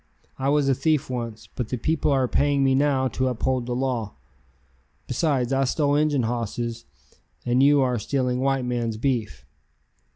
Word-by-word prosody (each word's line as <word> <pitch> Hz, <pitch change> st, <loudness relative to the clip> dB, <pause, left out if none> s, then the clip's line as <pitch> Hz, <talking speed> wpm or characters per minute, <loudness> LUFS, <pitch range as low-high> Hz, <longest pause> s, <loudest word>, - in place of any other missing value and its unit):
I 135 Hz, +1 st, 0 dB
was 145 Hz, -1 st, +2 dB
a 135 Hz, -, +4 dB
thief 145 Hz, +1 st, 0 dB
once, 115 Hz, -3 st, -5 dB
but 125 Hz, -3 st, -4 dB
the 125 Hz, -, -2 dB
people 155 Hz, +5 st, 0 dB
are 135 Hz, -2 st, +2 dB
paying 140 Hz, +1 st, +2 dB
me 135 Hz, -1 st, +3 dB
now 135 Hz, -1 st, +2 dB
to 130 Hz, 0 st, -1 dB
uphold 125 Hz, 0 st, -1 dB
the 120 Hz, -, -2 dB
law. 125 Hz, -, -2 dB, 0.9 s
Besides 130 Hz, -2 st, 0 dB
I 135 Hz, 0 st, +2 dB
stole 145 Hz, +2 st, +1 dB
Injun 145 Hz, -3 st, +2 dB
hosses 115 Hz, 0 st, -3 dB, 0.6 s
and 125 Hz, +1 st, +2 dB
you 145 Hz, 0 st, +5 dB
are 125 Hz, -3 st, +1 dB
stealing 125 Hz, +2 st, -1 dB
white 135 Hz, -1 st, 0 dB
men's 120 Hz, -3 st, -2 dB
beef." 110 Hz, -, -2 dB
130 Hz, 165 wpm, -24 LUFS, 120-140 Hz, 0.9 s, you